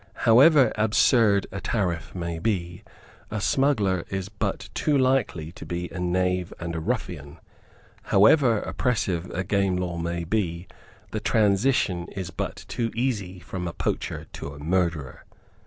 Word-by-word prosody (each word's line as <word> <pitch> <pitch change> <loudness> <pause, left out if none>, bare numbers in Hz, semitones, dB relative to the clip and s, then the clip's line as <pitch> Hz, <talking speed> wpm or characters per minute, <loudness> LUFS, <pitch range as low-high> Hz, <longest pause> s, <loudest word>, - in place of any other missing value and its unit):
However 135 +5 +6
absurd 110 -2 +4
a 95 0 -5
tariff 90 -7 -2
may 85 -2 -3
be, 85 -4 -2 0.5
a 110 - -3
smuggler 105 -8 +1
is 95 0 -3
but 100 -2 -3
too 150 +5 +1
likely 130 - +1
to - - -11
be 85 0 -4
a 95 - -6
knave 90 0 0
and 85 -1 -4
a - - -2
ruffian. 80 - -4 0.7
How 100 +1 +5
ever 120 -6 +5
oppressive 95 -8 -1
a 95 - -3
game 100 -1 +1
law 90 -2 -3
may 85 0 -2
be, 85 -2 -2 0.4
the 110 - -2
transition 105 -4 +2
is 95 -3 -5
but 80 - -5
too 115 -1 -2
easy 105 -7 -2
from 90 0 -5
a 85 - -4
poacher - - -3
to - - -6
a - - -11
murderer. 80 -3 -1
95 Hz, 150 wpm, -25 LUFS, 85-110 Hz, 0.7 s, However